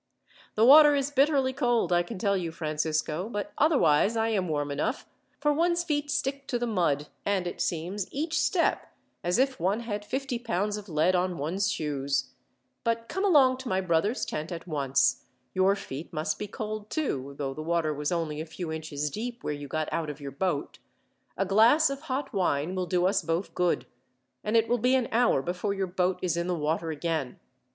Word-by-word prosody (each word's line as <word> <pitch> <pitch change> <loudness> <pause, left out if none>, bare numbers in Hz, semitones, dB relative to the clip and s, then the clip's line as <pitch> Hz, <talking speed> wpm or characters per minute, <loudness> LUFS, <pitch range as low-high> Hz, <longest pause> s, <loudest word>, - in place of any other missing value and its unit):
"The 220 - +4
water 295 +2 +9
is 280 0 0
bitterly 275 -2 +3
cold, 240 -8 +1
I 175 - +4
can 195 +5 -6
tell 200 +1 +1
you, 175 -4 -2
Francisco; 155 +2 -2
but 205 -3 -4
otherwise 230 - +4
I 225 0 +1
am 195 -5 0
warm 145 -2 -1
enough, 155 - -2 0.3
for 295 0 +2
one's 340 +3 +2
feet 295 -3 -1
stick 275 -1 -2
to 245 - 0
the 240 - -1
mud, 170 -10 +1 0.2
and 195 -3 0
it 175 - -4
seems, 180 +4 -2
each 315 +2 -1
step, 345 +2 +1 0.3
as 175 +2 +1
if 265 +1 +1
one 195 +7 0
had 210 -3 -4
fifty 260 +2 -3
pounds 210 -3 -1
of 210 -1 -8
lead 160 +3 +2
on 180 -1 0
one's 170 +8 -1
shoes. 140 -2 -2 0.5
But 230 0 -1
come 385 - -2
along 275 -9 +5
to 260 -1 -6
my 185 - +1
brother's 185 +5 +1
tent 155 +3 -4
at 170 -1 -6
once. 140 -5 +1 0.3
Your 190 +1 +3
feet 155 -5 -7
must 155 -1 -2
be 210 - -4
cold, 215 0 -5
too, 140 - -2
though 135 -2 -3
the 155 - -6
water 165 -1 0
was 145 +2 -2
only 160 -3 -2
a - - -5
few 165 +1 -6
inches 150 -2 -3
deep 240 - -5
where 150 - -2
you 145 0 -7
got 155 +2 -2
out 160 -2 -2
of 150 0 -7
your 140 -1 -6
boat. 145 +1 -2 0.6
A 195 - +1
glass 235 +11 +5
of 275 0 -5
hot 275 -2 -3
wine 175 -4 0
will 185 -1 -2
do 180 -1 +1
us 195 +1 +2
both 165 +3 -2
good; 180 -1 +1 0.6
and 215 +2 +2
it 225 0 +3
will 245 - +1
be 250 +4 +3
an 255 -3 +1
hour 230 - +3
before 185 +3 -2
your 195 -1 0
boat 180 0 0
is 175 -3 +1
in 170 +1 -1
the 180 - 0
water 160 +1 -1
again. 155 -4 -3
185 Hz, 205 wpm, -28 LUFS, 160-240 Hz, 0.6 s, water